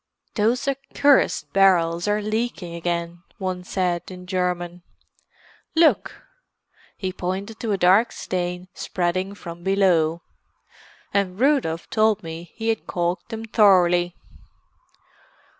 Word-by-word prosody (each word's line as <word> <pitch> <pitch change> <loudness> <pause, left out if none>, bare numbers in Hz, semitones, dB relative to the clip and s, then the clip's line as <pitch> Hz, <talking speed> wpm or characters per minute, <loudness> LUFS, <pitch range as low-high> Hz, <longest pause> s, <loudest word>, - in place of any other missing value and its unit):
"Those 235 +5 +1
accursed 275 +1 +2
barrels 175 -2 +3
are 210 0 +1
leaking 215 -5 -2
again," 170 0 -3 0.2
one 185 -2 -3
said, 180 -2 -2
in 180 -1 -10
German. 180 -1 -2 0.9
"Look!" 320 -1 +2 0.7
He 185 -2 -3
pointed 195 +5 -4
to 225 -3 -2
a 200 - +1
dark 190 +6 +4
stain 180 0 -4
spreading 185 +2 -2
from 170 -3 -9
below. 175 -4 +2 0.9
"And 195 -1 0
Rudolf 255 - +1
told 215 -2 +2
me 165 +1 -8
he 225 0 -2
had 225 - -1
caulked 175 +3 -2
them 225 -1 -5
thoroughly." 180 -5 +4
185 Hz, 110 wpm, -23 LUFS, 175-215 Hz, 0.9 s, dark